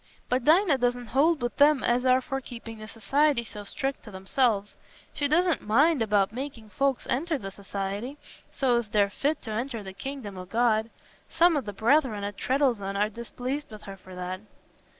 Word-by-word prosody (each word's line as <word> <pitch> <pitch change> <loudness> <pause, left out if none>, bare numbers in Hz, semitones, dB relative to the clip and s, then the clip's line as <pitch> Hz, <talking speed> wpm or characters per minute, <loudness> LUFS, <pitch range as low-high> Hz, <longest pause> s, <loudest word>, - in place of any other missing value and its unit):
But 250 0 0
Dinah 320 -3 +5
doesn't 245 0 0
hold 295 +1 +3
wi' 240 - +1
them 290 -1 +5
as 245 +2 +1
are 255 0 +4
for 270 -1 -4
keeping 230 -3 -9
the 215 - -8
Society 270 +5 +1
so 210 -2 -9
strict 270 +6 -3
to - - -12
themselves. 205 +2 0 0.4
She 290 - +1
doesn't 345 +3 +2
mind 280 +7 +3
about 205 -2 +2
making 250 -4 -6
folks 275 +3 0
enter 310 +5 0
the 195 -6 -7
Society, 200 +6 -5 0.3
so 250 -3 +2
as 235 -2 -2
they're 205 -1 +2
fit 290 +8 -1
t' 220 - -6
enter 230 0 -3
the 190 -1 -8
kingdom 210 -3 -6
o' 185 - -7
God. 225 +1 +1 0.4
Some 335 +1 +4
o' 290 - +1
the 210 -4 -6
brethren 225 0 +2
at 205 0 -4
Treddles'on 235 -6 0
are 210 +1 +2
displeased 245 +5 -5
with 215 -2 -11
her 195 - -8
for 185 -1 -13
that." 180 +1 -5
240 Hz, 190 wpm, -27 LUFS, 205-275 Hz, 0.4 s, Dinah